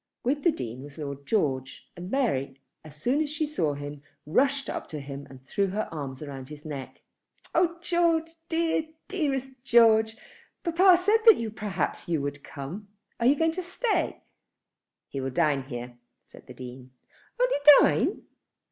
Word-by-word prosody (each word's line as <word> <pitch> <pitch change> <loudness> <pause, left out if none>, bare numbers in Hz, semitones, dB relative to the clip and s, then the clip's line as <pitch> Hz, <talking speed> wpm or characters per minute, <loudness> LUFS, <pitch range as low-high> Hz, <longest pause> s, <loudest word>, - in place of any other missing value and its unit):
With 280 +4 0
the 340 - +4
Dean 120 - -6
was 140 0 -11
Lord 140 -2 -6
George, 135 - -1
and 175 +1 -7
Mary, 140 - 0 0.2
as 155 -2 -13
soon 250 - +1
as 305 - -1
she 305 +1 -1
saw 160 - -1
him, 145 0 -7 0.2
rushed 275 - +2
up - - -4
to 155 - -5
him 140 0 -8
and 130 -1 -14
threw 200 +7 0
her 205 +3 -2
arms 140 -3 -6
round 135 -2 -8
his 150 0 -11
neck. 140 -4 -7 0.5
"Oh 340 0 +2
George, 335 -2 +2 0.2
dear, 325 -1 +1 0.2
dearest 275 -8 -1
George, 225 -3 +5 0.5
papa 355 +1 +6
said 410 +5 +3
that 230 - +6
perhaps 205 -4 -3
you 165 -3 +1
would 140 0 -4
come. 165 +10 -7 0.3
You 250 +4 +6
are - - -13
going 325 +1 +2
to 365 +3 -4
stay?" 410 +6 -1 0.8
"He 135 - -5
will 135 - -2
dine 145 -3 +1
here," 120 -2 -7 0.2
said - - -17
the - - -11
Dean. 125 0 -9 0.5
"Only - - +3 0.2
dine!" - - +2
190 Hz, 165 wpm, -27 LUFS, -, 0.8 s, papa